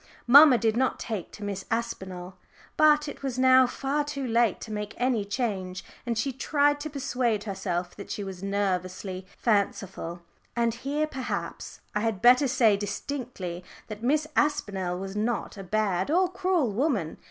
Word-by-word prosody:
Mamma 280 +1 +9
did 225 0 +1
not 260 +2 +1
take 215 -7 -4
to 210 - -9
Miss 200 -2 -4
Aspinall. 190 -6 -4 0.4
But 300 -1 +5
it 290 - -7
was 265 -3 -3
now 260 0 +6
far 275 +4 -1
too 285 -2 -4
late 235 -4 +2
to 220 - -7
make 210 0 -4
any 245 -4 +1
change, 200 -4 -3 0.2
and 235 -2 -1
she 265 +4 -1
tried 290 +2 +2
to 310 +1 -5
persuade 250 -6 -1
herself 180 -3 -3
that 200 - -9
she 205 - -4
was 190 -2 -7
nervously 190 -1 -2
fanciful. 195 -5 -1 0.3
And 235 -1 +1
here, 280 +6 -1
perhaps, 265 -4 -5
I 210 - 0
had 220 -2 -1
better 250 +5 +6
say 235 -5 +4
distinctly, 205 -4 -5 0.3
that 215 0 -7
Miss 295 +5 +2
Aspinall 195 -12 0
was 195 +1 -6
not 225 +3 -2
a 200 - -7
bad 190 0 0
or 360 +3 +3
cruel 365 - +1
woman. 215 - -1
225 Hz, 165 wpm, -27 LUFS, 195-270 Hz, 0.4 s, Mamma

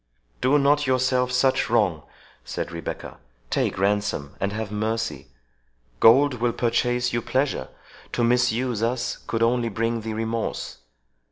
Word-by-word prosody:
"Do 140 +3 +4
not 145 +1 +4
do 145 - -2
yourself 130 0 +2
such 130 +1 +2
wrong," 100 -9 +2 0.4
said - - -5
Rebecca; 85 0 -6 0.3
"take - - 0
ransom, 100 -7 0
and 100 +1 -1
have 105 0 -4
mercy!—Gold 110 - 0
will 120 -1 +1
purchase 120 +1 0
you 120 - 0
pleasure,—to 130 -2 -3
misuse 120 -1 +1
us, 120 +1 -1
could 115 0 -2
only 120 0 +2
bring 115 +2 -1
thee 110 0 -4
remorse. 115 +1 -3
115 Hz, 125 wpm, -24 LUFS, 105-125 Hz, 0.4 s, Do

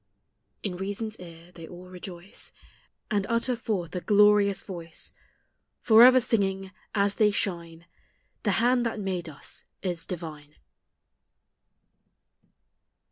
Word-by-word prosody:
In 185 -4 -3
Reason's 205 +3 -4
ear 170 -1 -12
they 165 -2 -11
all 180 +2 -11
rejoice, 180 0 -9 0.6
And 205 -2 +1
utter 235 +2 +1
forth 195 -7 -3
a 180 - -2
glorious 205 -1 +4
voice, 170 -4 -6 0.7
Forever 245 +3 +8
singing, 195 -5 0 0.2
as 200 0 +2
they 210 - +6
shine, 170 -5 -3 0.3
" - - -44
The - - +1
hand 245 +1 +3
that 225 - -4
made 185 -4 -3
us 145 - -7 0.2
is 175 -3 -3
divine 155 -5 -7
195 Hz, 115 wpm, -27 LUFS, 175-210 Hz, 0.7 s, Forever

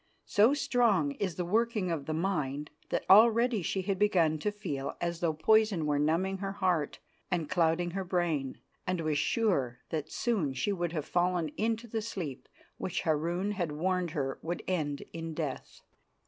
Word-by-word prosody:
So 225 +7 +4
strong 230 - +2
is 185 -5 -1
the 180 - -2
working 215 -1 +1
of 155 -4 -3
the 155 - -1
mind 150 -5 -2 0.2
that - - -1
already 230 +2 +6
she 190 +2 -1
had 195 -1 -1
begun 170 -7 +3
to 210 - -1
feel 145 -10 -4
as 170 -1 -2
though 170 -2 +1
poison 210 +1 +3
were 145 -1 +1
numbing 175 +6 +1
her 195 0 -3
heart 180 -7 0 0.3
and 175 -5 -1
clouding 175 +1 +1
her 195 +2 -3
brain, 170 -7 -1 0.3
and 185 -1 0
was 155 -2 0
sure 145 - +1
that 155 -1 -3
soon 195 - 0
she 130 +11 0
would 175 -3 -2
have 155 -4 -2
fallen 175 -2 +1
into 225 +7 -1
the 225 0 -2
sleep 180 - -5 0.3
which 185 - -2
Harun 170 +4 0
had 175 -7 -2
warned 180 +3 0
her 135 -1 -2
would 170 +2 -4
end 150 -6 -1
in 165 -1 -5
death. 150 -5 -5
175 Hz, 175 wpm, -30 LUFS, 155-200 Hz, 0.3 s, already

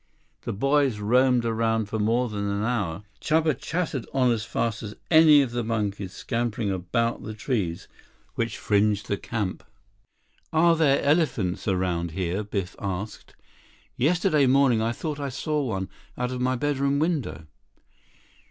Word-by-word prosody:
The - - -4
boys 135 +2 +2
roamed 125 +3 +3
around 115 -1 +1
for 110 +2 -4
more 115 +4 +2
than 100 -2 -3
an 100 +1 -1
hour. 105 -7 -1 0.2
Chuba 155 0 +2
chattered 145 -1 -3
on 130 -2 +4
as 110 -2 -1
fast 115 -1 -2
as 105 -1 -7 0.2
any 155 -3 +7
of 125 - -4
the 120 0 -2
monkeys 105 -4 -2
scampering 115 -3 -2
about 95 +6 -1
the 110 - -7
trees 105 -7 -2 0.5
which 115 0 -2
fringed 105 +1 +1
the 100 - -1
camp. 105 -4 -3 0.9
"Are 165 +1 +4
there 145 -4 +3
elephants 140 - +1
around 90 -3 0
here?" 95 +2 -1
Biff 100 -3 -4
asked. 100 +2 -5 0.6
"Yesterday 155 -1 +2
morning 130 -3 +4
I 115 +1 +1
thought 150 +4 -4
I 140 -1 -3
saw 150 +3 -1
one 95 -7 -2 0.3
out 125 0 -2
of 125 -1 -4
my 130 +1 +1
bedroom 140 +1 0
window." 150 - -1
115 Hz, 150 wpm, -25 LUFS, 105-140 Hz, 0.9 s, any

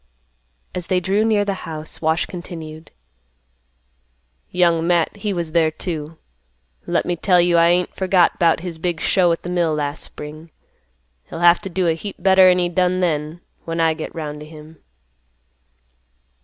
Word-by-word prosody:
As 180 -1 -5
they 185 - +2
drew 195 +4 +1
near 215 -2 +2
the 200 - -1 0.2
house, 155 -1 -6
Wash 160 +1 +1
continued, 165 -3 -9 1.6
"Young 170 -2 +2
Matt 175 +1 +1
he 205 0 -3
was 170 -4 -3
there 160 -1 +3
too. 160 -1 -5 0.7
Let - - 0
me 175 - -1
tell 180 +2 +3
you 175 0 +3
I 170 0 +5
ain't 175 +1 +1
forgot 185 -2 +2
'bout 165 -2 +3
his 170 -3 -6
big 175 -1 -2
show 175 +2 +2
at 165 - -2
th' 175 - -5
mill 170 -3 +1
last 145 0 -3
spring; 155 +2 -10 0.8
he'll 165 - -8
have 175 0 +5
t' 195 - -6
do 185 0 0
a 165 - +3
heap 195 +5 -7
better'n 190 -1 +5
he 175 -1 +1
done 180 +1 +1
then, 155 -1 -2 0.2
when 165 0 -3
I 165 -1 +3
get 155 +2 -7
'round 150 -2 -5
t' 150 - -10
him." 155 0 -14
170 Hz, 170 wpm, -20 LUFS, 160-180 Hz, 1.6 s, I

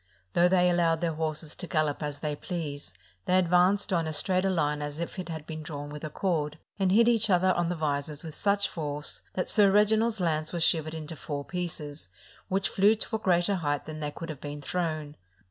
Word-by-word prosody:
Though 175 +1 +5
they 180 0 +4
allowed 170 -2 +2
their 170 -2 0
horses 155 0 -2
to 180 - -6
gallop 155 -4 0
as 145 -1 -4
they 150 -1 -2
pleased, 145 - -5 0.3
they 185 - +3
advanced 185 +3 +3
on 165 -2 +1
as 155 -1 -1
straight 185 +2 +1
a - - +3
line 150 -5 0
as 145 +1 -5
if 170 +3 -4
it 180 -2 -5
had 160 -2 -5
been 155 -1 -6
drawn 145 -1 -6
with 150 +1 -8
a 155 - -3
cord, 155 -3 -1 0.2
and 190 -1 +2
hit 230 +4 +5
each 225 -2 +3
other 185 0 +4
on 175 -1 0
the 175 - -1
visors 150 -1 -2
with 160 -2 -7
such 200 +2 +1
force 150 -2 -3
that 185 - -1
Sir 205 -2 +5
Reginald's 215 +2 +3
lance 155 -3 0
was 170 -2 +1
shivered 160 -1 +2
into 160 0 -6
four 145 -1 -5
pieces, 160 -5 -5 0.4
which 195 +1 +1
flew 205 +3 +4
to 220 +1 -2
a - - -1
greater 185 0 +2
height 145 -4 -1
than 155 0 -7
they 150 -1 -2
could 165 +3 -8
have 150 -3 -7
been 145 0 -6
thrown. 155 -2 -3
165 Hz, 220 wpm, -28 LUFS, 150-185 Hz, 0.4 s, Though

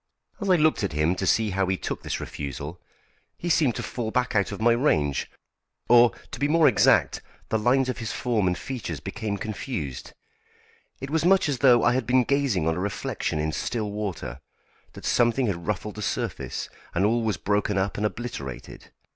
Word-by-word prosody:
As 200 -3 -3
I 185 - +6
looked 155 -7 +2
at 95 - -1
him 75 +3 +2
to 95 0 -2
see 110 +1 +2
how 95 0 0
he 95 0 0
took - - -4
this - - -3
refusal, 70 +4 -6 0.6
he 175 - -4
seemed 150 -8 +3
to - - -4
fall 115 -3 -3
back 125 +1 0
out 100 -1 +2
of 100 - -6
my 120 +2 +4
range, 80 - +1 0.6
or, 120 0 +7 0.2
to - - -7
be 145 - +2
more 160 +1 +5
exact, - - +4 0.3
the 110 - +1
lines 130 +4 +3
of 130 - -3
his 115 -2 -3
form 115 -6 0
and 90 0 0
features 110 - -5
became 105 +7 -4
confused. 100 - -5 0.9
It 135 +1 -6
was 160 0 +1
much 190 +1 +4
as 140 -4 -1
though 120 -3 +6
I 120 - +4
had 125 -3 -1
been 125 0 +4
gazing 130 - +1
on 80 +1 +1
a - - -2
reflection 100 -4 -2
in 75 +1 -1
still 105 +4 -2
water; 100 - -4 0.5
that - - -10
something 120 +2 +2
had 85 -6 -3
ruffled 105 0 -2
the - - -5
surface, - - -3 0.3
and 90 +3 +3
all 115 +3 +2
was 110 -2 -1
broken 105 0 0
up 95 +1 0
and 105 - -3
obliterated. 105 - -5
110 Hz, 195 wpm, -25 LUFS, 95-125 Hz, 0.9 s, or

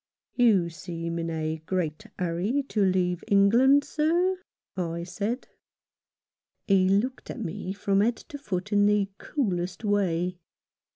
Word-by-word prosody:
"You 200 -9 +3
seem 170 0 -5
in 165 0 -2
a 160 -1 -2
great 180 +2 -2
hurry 185 +10 0
to 215 - 0
leave 180 -2 +1
England, 235 +8 +5
sir," 345 +6 +1 0.4
I 170 -2 -3
said. 205 +8 -4 1.2
He 190 -2 +4
looked 230 +7 0
at - - -6
me 180 +1 -4
from 200 0 +1
head 230 +3 +2
to 290 -3 -10
foot 205 -5 -4
in 205 0 +5
the 205 -1 +2
coolest 185 - -2
way. 180 -3 0
195 Hz, 130 wpm, -27 LUFS, 175-230 Hz, 1.2 s, England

